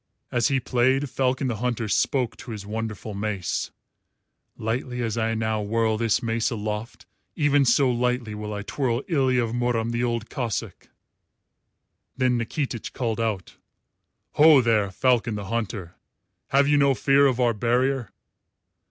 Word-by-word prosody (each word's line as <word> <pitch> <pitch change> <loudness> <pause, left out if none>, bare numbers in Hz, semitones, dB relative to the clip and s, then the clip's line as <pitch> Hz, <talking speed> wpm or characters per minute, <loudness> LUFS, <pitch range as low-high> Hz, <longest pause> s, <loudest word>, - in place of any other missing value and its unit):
As 120 -2 +2
he 135 -1 +1
played, 130 +2 +1
Falcon 130 0 0
the 120 -4 -1
Hunter 120 -1 -2
spoke 120 +3 +1
to 120 - -11
his 105 -3 -6
wonderful 110 0 -5
mace: 100 -3 -2 0.9
"Lightly 125 +3 -3
as 115 -2 -2
I 115 0 0
now 110 -1 -1
whirl 110 +1 +1
this 115 -1 +1
mace 115 0 0
aloft, 105 0 -5 0.3
even 145 -3 +3
so 125 +2 +4
lightly 125 -2 -1
will 105 0 -5
I 105 -1 -4
twirl 125 +1 -1
Ilya 130 -7 +2
of 115 - -3
Murom 120 -2 0
the 120 +1 -1
Old 115 -2 -1
Cossáck." 115 -7 -4 1.3
Then 130 -1 +2
Nikitich 120 0 -3
called 115 -3 -2
out, 110 -5 -3 0.7
"Ho, 150 -1 +7
there, 110 -5 +2
Falcon 120 +2 +1
the 105 -1 -5
Hunter! 105 -5 -4 0.5
Have 140 +1 +3
you 145 0 +4
no 140 -1 +4
fear 140 +2 +4
of 130 -2 0
our 120 -2 +3
barrier?" 120 +2 0
120 Hz, 150 wpm, -25 LUFS, 110-130 Hz, 1.3 s, Ho